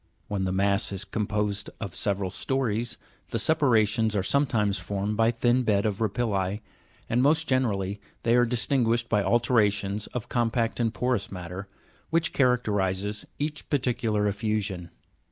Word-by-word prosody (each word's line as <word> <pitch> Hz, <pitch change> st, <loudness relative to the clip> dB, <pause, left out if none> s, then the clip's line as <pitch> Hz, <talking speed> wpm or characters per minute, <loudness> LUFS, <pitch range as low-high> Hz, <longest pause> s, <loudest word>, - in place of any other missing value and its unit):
When 100 Hz, -2 st, -1 dB
the 95 Hz, -, -1 dB
mass 100 Hz, +2 st, +1 dB
is 100 Hz, 0 st, -3 dB
composed 105 Hz, 0 st, -2 dB
of 100 Hz, -6 st, -5 dB
several 100 Hz, -1 st, 0 dB
stories, 120 Hz, 0 st, -1 dB, 0.3 s
the -, -, -1 dB
separations 115 Hz, -7 st, +3 dB
are 100 Hz, -, +1 dB
sometimes 110 Hz, -6 st, +1 dB
formed 100 Hz, +1 st, -2 dB
by 115 Hz, +1 st, +3 dB
thin 120 Hz, +2 st, +2 dB
beds 105 Hz, -4 st, +1 dB
of 105 Hz, -1 st, -1 dB
rapilli, 105 Hz, -2 st, 0 dB, 0.5 s
and 120 Hz, +2 st, +1 dB
most 155 Hz, +4 st, +3 dB
generally 100 Hz, -6 st, 0 dB, 0.2 s
they 115 Hz, +1 st, +3 dB
are 120 Hz, 0 st, +5 dB
dis 120 Hz, 0 st, +1 dB
tinguished 120 Hz, -3 st, +1 dB
by 105 Hz, -2 st, +3 dB
alternations 105 Hz, -3 st, +1 dB
of 120 Hz, -4 st, -5 dB
compact 115 Hz, -1 st, 0 dB
and 115 Hz, -2 st, +1 dB
porous 125 Hz, -3 st, -1 dB
matter, 90 Hz, +1 st, -6 dB, 0.4 s
which 165 Hz, +1 st, +1 dB
characterizes 105 Hz, -5 st, +1 dB
each 150 Hz, +1 st, -4 dB
particular 115 Hz, -6 st, +1 dB
effusion. 105 Hz, -4 st, -2 dB
110 Hz, 145 wpm, -27 LUFS, 100-120 Hz, 0.5 s, are